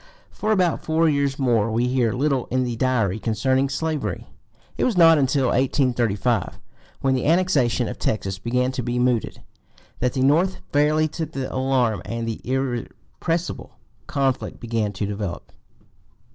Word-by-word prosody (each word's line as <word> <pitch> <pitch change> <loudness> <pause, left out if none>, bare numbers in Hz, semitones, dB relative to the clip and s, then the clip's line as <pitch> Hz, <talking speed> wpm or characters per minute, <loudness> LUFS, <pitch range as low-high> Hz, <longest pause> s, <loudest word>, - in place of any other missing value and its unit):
For 215 - -2
about 185 -5 +1
four 160 +1 +2
years 140 -2 +1
more 115 -5 +2
we 120 +3 +1
hear 125 -3 +1
little 135 +1 0
in 130 +1 0
the 120 -2 -2
Diary 115 -5 0
concerning 130 +5 +1
slavery. 155 +2 -3 0.5
It - - -1
was 235 -7 +1
not 165 -2 +7
until 135 -1 +2
1835, 120 -5 +1 0.4
when 135 -1 +2
the 130 - 0
annexation 150 -9 +2
of - - -6
Texas 95 -3 -2
began 125 +3 0
to 130 - -3
be 120 +1 -2
mooted, 125 -2 0 0.6
that 125 0 0
the 130 - -1
North 165 +8 +3 0.2
fairly 150 +2 +3
took 160 0 -5
the 135 -1 -4
alarm, 130 -6 +1
and 115 0 -4
the 115 - -4
irrepressible 135 +6 -3 0.3
conflict 135 -2 -1
began 115 -3 -1
to 100 +2 -3
develop. 100 -3 -5
130 Hz, 150 wpm, -23 LUFS, 115-145 Hz, 0.6 s, not